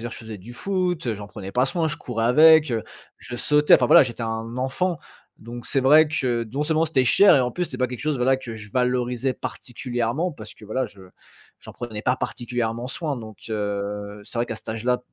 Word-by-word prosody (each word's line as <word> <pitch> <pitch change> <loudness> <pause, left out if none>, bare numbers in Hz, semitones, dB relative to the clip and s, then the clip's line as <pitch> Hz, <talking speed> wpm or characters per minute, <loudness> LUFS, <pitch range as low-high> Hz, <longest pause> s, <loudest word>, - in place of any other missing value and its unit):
dire, - - -10
je - - -7
faisais 110 -2 -8
du 115 +6 -11
foot, 180 -3 -1
heu, 115 - 0
j'en 105 0 -9
prenais 100 -2 -8
pas 125 +1 +3
soin, 165 +2 -1
je 155 - -3
courais 115 -2 -3
avec, 155 +2 +6
heu, 110 - -1 0.4
je 120 - -7
sautais 150 +3 +4
enfin 125 - +4
voilà, - - +8
j'étais 120 -1 -4
un 115 +1 -4
enfant. 145 +7 -1 0.4
Donc 120 +1 -9
c'est 135 - -1
vrai 150 +4 +6
que 125 -6 0
non 145 +2 -1
seulement 160 +1 +1
c'était 135 -4 +2
cher 195 +7 +6
et - - +4
en 125 0 -1
plus 180 - -1
c'était - - -8
pas 130 - +2
quelque 125 0 -7
chose 150 -2 -1
voilà, 130 +2 +2
que 120 -4 -8
je 105 -1 -11
valorisais 125 0 0
particulièrement. 125 +7 -3
Parce 110 -7 -11
que - - -15
voilà, 125 +5 -2
je 95 -1 -15 0.6
j'en - - -11
prenais 110 -3 -7
pas 125 +1 +1
particulièrement 120 -1 -3
soin 150 0 -3
donc, 110 -3 -10
heu. 105 -1 -4
C'est - - -10
vrai 120 - +1
qu'à 115 - -5
cet - - -15
âge 110 0 -4
là 125 0 +2
125 Hz, 230 wpm, -23 LUFS, 115-145 Hz, 0.6 s, voilà